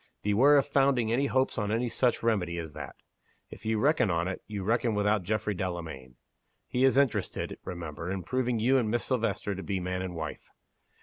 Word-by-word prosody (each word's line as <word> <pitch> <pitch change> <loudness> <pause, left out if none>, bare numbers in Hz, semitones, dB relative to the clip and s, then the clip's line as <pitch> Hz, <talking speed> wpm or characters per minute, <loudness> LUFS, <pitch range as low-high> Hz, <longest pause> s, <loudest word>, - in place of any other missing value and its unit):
Beware 125 +9 +5
of 140 - +3
founding 135 -5 +2
any 135 +4 +2
hopes 130 -3 +1
on 105 -1 -1
any 115 +3 +1
such 120 0 +1
remedy 95 -7 +1
as 80 -3 -5
that! - - -8 0.6
If - - -9
you 110 0 +1
reckon 140 -2 +3
on 85 0 0
it, 95 - -4
you 105 -3 -4
reckon 115 +2 +1
without 105 0 +2
Geoffrey 105 +3 -1
Delamayn. 85 -9 -5 0.5
He 125 +1 +1
is 135 0 +4
interested, 140 -4 0
remember, 85 -1 -6
in 95 -1 -3
proving 125 +2 0
you 130 +5 +3
and 110 -4 0
Miss 120 +2 0
Silvester 115 -5 -1
to 95 - -6
be 95 -1 -2
man 90 0 -3
and 90 -2 -5
wife. 80 -1 -6
105 Hz, 195 wpm, -29 LUFS, 90-125 Hz, 0.6 s, Beware